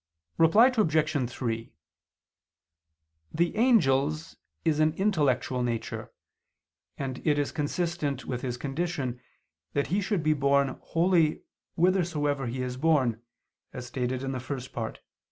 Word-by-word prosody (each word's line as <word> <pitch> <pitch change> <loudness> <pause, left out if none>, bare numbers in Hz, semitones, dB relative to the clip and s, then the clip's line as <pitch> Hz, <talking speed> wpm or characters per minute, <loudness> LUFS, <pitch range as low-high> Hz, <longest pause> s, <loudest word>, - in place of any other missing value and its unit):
Reply 220 +11 +6
Obj. 155 - +1
3: 115 -2 -4 1.6
The 170 +2 0
angel's 155 - +2 0.3
is 155 -2 +2
an 155 0 +3
intellectual 145 -10 +1
nature, 120 -2 -3 0.9
and 130 -2 -4
it 150 -2 +2
is 145 -1 0
consistent 150 -3 -2
with 125 -2 -3
his 125 -2 -3
condition 135 -3 -3 0.5
that 140 - 0
he 205 - +2
should 190 -3 -1
be 155 0 +3
borne 140 -1 +2
wholly 165 -2 +2 0.3
whithersoever 160 -7 +1
he 125 +2 -3
is 125 0 -4
borne, 130 -7 +2 0.5
as 125 - -6
stated 125 +1 -2
in 135 - -2
the 130 - -3
First 130 0 -6
Part 115 -2 -4
(Q. - - -20
145 Hz, 130 wpm, -28 LUFS, 130-165 Hz, 1.6 s, Reply